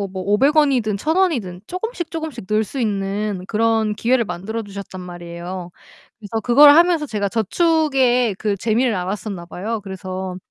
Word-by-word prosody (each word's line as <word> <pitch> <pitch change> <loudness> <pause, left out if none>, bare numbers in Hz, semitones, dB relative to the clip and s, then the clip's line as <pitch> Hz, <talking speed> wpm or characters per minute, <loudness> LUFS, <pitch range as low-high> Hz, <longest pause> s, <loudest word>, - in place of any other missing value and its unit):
어 200 - -1
뭐 190 -1 -6
500 235 +11 +2
원이든 255 -9 +3
1,000 310 - -1
원이든 235 - 0
쪼금씩 365 -2 -4
쪼금씩 315 -9 -5
넣을 215 +1 +2
수 220 +6 -6
있는 200 -3 -2
그런 225 -1 +1
기회를 235 +2 +2
만들어 195 +6 -4
주셨단 200 -2 -8
말이에요. 175 0 -7 0.5
그래서 220 +1 -4
그걸 280 +6 +8
하면서 335 +1 +5
제가 205 -5 -2
저축의 250 - +2
그 205 0 -1
재미를 230 +3 +1
알았었나 185 -1 -4
봐요. 215 +6 -4
그래서 185 -1 -6
215 Hz, 345 characters per minute, -20 LUFS, 190-260 Hz, 0.5 s, 그걸